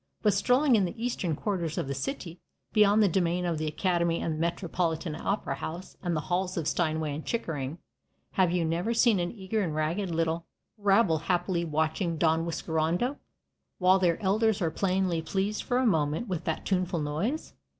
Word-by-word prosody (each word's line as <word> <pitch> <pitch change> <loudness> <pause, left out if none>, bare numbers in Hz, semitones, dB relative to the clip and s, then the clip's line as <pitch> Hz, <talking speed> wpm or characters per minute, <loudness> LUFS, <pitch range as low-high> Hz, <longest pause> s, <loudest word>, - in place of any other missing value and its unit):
But 210 -2 +4
strolling 250 +6 +4
in 200 -4 +3
the 180 - -5
eastern 225 -9 -1
quarters 170 -4 -2
of - - 0
the 140 - -2
city, 180 - -5 0.3
beyond 210 0 +5
the - - +5
domain 180 0 +1
of 165 -3 -1
the 155 - -1
Academy 170 +1 +1
and 165 - -1
the 155 - -5
Metropolitan 170 -1 -1
Opera 195 +6 -2
house 175 +4 -6
and 175 -2 -1
the 155 - 0
halls 180 +2 -1
of 160 -3 -1
Steinway 155 -2 0
and 150 +2 -5
Chickering, 155 - -3 0.5
have 185 -3 +2
you 175 -2 +1
never 175 +8 0
seen 230 -4 +4
an 175 0 -1
eager 210 0 -2
and 165 -6 -2
ragged 165 +6 -1
little 165 0 -1 0.3
rabble 200 -5 +3
happily 175 +1 0
watching 160 +2 0
Don 160 +1 +2
Whiskerando, 165 - -1 0.6
while 185 +1 +4
their 175 -3 +2
elders 215 +2 +2
are 165 -3 0
plainly 185 -2 0
pleased 195 +6 -1
for 245 - 0
a 255 - +2
moment 160 +1 +1
with 180 -5 -3
that 160 - -2
tuneful 180 -2 0
noise? 170 - -2
175 Hz, 180 wpm, -28 LUFS, 160-200 Hz, 0.6 s, beyond